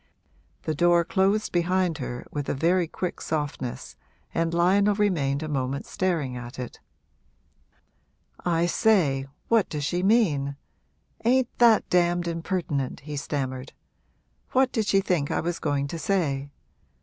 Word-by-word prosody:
The 155 - -1
door 170 +2 +4
closed 200 +4 +1
behind 175 -1 +1
her 120 0 -5
with 145 -1 -3
a - - 0
very 170 +4 +2
quick 180 +2 -4
softness 145 -5 -4 0.4
and 165 0 0
Lionel 195 +4 +3
remained 160 -9 +1
a - - -4
moment 135 -2 -2
staring 165 -9 -1
at 125 +1 -8
it. 125 -2 -7 1.6
'I 170 -1 +2
say, 170 - +2 0.2
what 225 -3 +3
does 150 -2 -3
she 175 +5 0
mean? 175 -10 +2 0.7
ain't 250 +1 +2
that 235 -2 +5
damned 175 -1 +2
impertinent?' 165 -5 -2
he 150 +1 -6
stammered. 135 -2 -4 0.8
'What 260 0 +3
did 220 -3 -1
she 195 -1 +4
think 175 -7 0
I - - 0
was 170 +1 -2
going 145 -2 0
to 165 - -5
say? 145 -6 0
170 Hz, 135 wpm, -26 LUFS, 140-190 Hz, 1.6 s, that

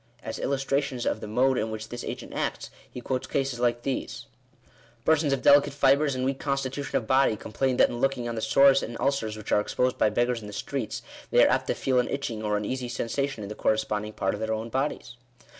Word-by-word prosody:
As - - -5
illustrations 135 -2 -1
of 110 - -1
the - - -6
mode 125 +4 +2
in 110 - -1
which 110 0 -6
this 120 - -6
agent - - -6
acts, - - -3 0.2
he 125 - -8
quotes 130 +1 -2
cases 135 -3 -1
like 120 0 +1
these: 135 -2 -3 0.4
— - - -30
"Persons 160 -2 +3
of 135 -2 0
delicate 140 -1 +6
fibres, 140 0 +3
and 130 0 -1
weak 135 0 -1
constitution 140 0 -2
of 110 - -3
body, 130 -1 +3
complain 125 +4 -1
that - - +5
in 120 - -5
looking 135 -3 0
on 120 - -3
the 110 - -3
sores 135 +5 +5
and 115 +1 -5
ulcers 115 -6 0
which 110 - -7
are - - +5
ex 105 - -4
posed 125 0 +1
by - - +4
beggars 120 +2 0
in 105 - -9
the 105 - -9
streets, 115 0 -4 0.3
they - - +6
are - - +3
apt - - +1
to - - 0
feel 130 -2 +1
an 125 - +1
itching 120 -6 -3
or 105 -1 0
uneasy 125 +4 -3
sensation 120 0 -2
in 100 - -6
the - - -4
corresponding 105 0 -1
part 95 - -1
of 105 - -5
their 110 0 -1
own 110 +1 -4
bodies." 130 -2 -3
125 Hz, 235 wpm, -27 LUFS, 110-135 Hz, 0.4 s, delicate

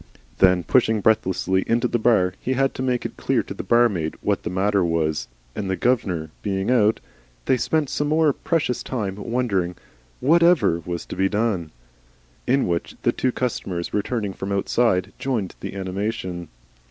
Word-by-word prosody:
Then 90 -2 +5
pushing 110 +3 +3
breathlessly 95 -3 +2
into 120 +2 +2
the 120 - 0
bar, 95 -6 +3
he 130 - -1
had 135 +1 +1
to - - -5
make 125 -2 0
it - - -5
clear - - +1
to - - -7
the - - -5
barmaid 105 -10 +2
what - - 0
the - - -4
matter 100 +2 +1
was, 80 -5 0 0.3
and 100 -2 -3
the 95 - 0
'gov'nor' 90 -11 0
being 95 +2 -1
out, 110 -3 +3 0.5
they - - +3
spent 150 +5 0
some 145 +2 -1
more 155 -1 +3
precious 150 -6 -1
time 105 -7 -3
wondering 100 -6 -1 0.4
'what 165 +6 +4
EVER' 170 - +4
was 85 -1 -4
to - - -7
be 95 +1 +1
done! 105 -6 0 0.8
in 135 +2 +2
which 85 -1 -2
the - - +3
two 130 - 0
customers 95 -9 -3
returning 105 -1 -1
from 95 +1 -5
outside 100 -1 +1
joined 115 -9 -2
with - - -5
animation. 95 -2 -4
105 Hz, 170 wpm, -23 LUFS, 90-125 Hz, 0.8 s, Then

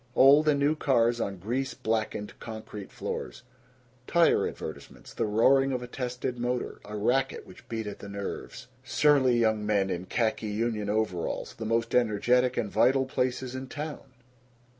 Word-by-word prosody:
Old 145 +3 +7
and 145 -2 +4
new 145 +2 +3
cars 120 -5 +2
on 100 -2 -3
grease 120 +9 -2
blackened 110 -2 -2
concrete 110 -3 -8
floors. - - -5 0.6
Tire 170 0 +4
advertisements. - - -9
The - - -1
roaring 135 +6 +4
of 125 -1 -2
a - - -6
tested 125 0 -4
motor; 125 +1 -2
a 105 +1 -6
racket 130 +5 0
which 95 - -16
beat 115 -1 -3
at 105 - -6
the 100 - -9
nerves. 100 0 -6 0.2
Surly 135 -5 +3
young 110 -2 +2
men 100 -2 +1
in 90 +1 -4
khaki 110 -2 0
union 105 -1 -1
overalls. 105 -5 -2
The 110 - -7
most 115 0 0
energetic 125 +2 +2
and 105 -3 -1
vital 135 +2 +3
places 130 -1 -2
in 130 0 -5
town. 150 +2 -6
120 Hz, 160 wpm, -28 LUFS, 105-130 Hz, 0.6 s, Old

